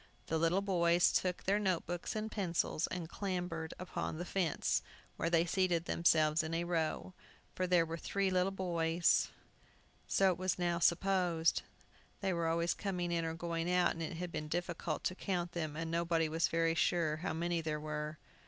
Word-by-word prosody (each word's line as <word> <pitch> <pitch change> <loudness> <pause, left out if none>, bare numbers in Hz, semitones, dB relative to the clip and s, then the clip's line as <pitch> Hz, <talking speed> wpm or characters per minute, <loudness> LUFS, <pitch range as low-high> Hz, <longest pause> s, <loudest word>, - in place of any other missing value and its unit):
The 160 - 0
little 170 +4 +2
boys 175 -3 +3
took 180 -1 0
their 200 +2 +2
note 190 -4 0
books 175 +4 -4
and 215 0 -3
pencils, 170 -4 0
and 180 -3 -4
clambered 180 -4 -3
upon 180 -3 -4
the 175 - -4
fence, 175 -4 0 0.3
where 165 - -1
they 170 0 +3
seated 175 -2 +1
themselves 155 -2 +3
in 160 +1 -3
a 170 - 0
row. 170 +1 -1 0.4
For 185 - -1
there 175 -2 +4
were 165 +1 -4
three 195 +2 0
little 185 +1 +2
boys. 170 -3 +2 0.8
So 195 -1 +4
it 180 - -4
was 185 0 0
now 175 -1 0
supposed. 175 -1 +2 0.6
They 195 -2 0
were 170 -1 0
always 170 +1 +1
coming 180 -4 -2
in 170 -1 0
or 160 0 -3
going 170 0 -2
out, 180 -1 +4
and 165 - -6
it 165 +1 -4
had 175 0 -4
been 150 - -4
difficult 170 -1 -3
to - - 0
count 180 -2 -2
them, 155 -3 -3
and 165 +1 -3
nobody 165 -1 +1
was 160 +1 +1
very 165 0 +1
sure 165 -2 +1
how 175 +2 -3
many 170 +1 -1
there 155 -1 -2
were. 150 0 -4
170 Hz, 185 wpm, -34 LUFS, 165-180 Hz, 0.8 s, there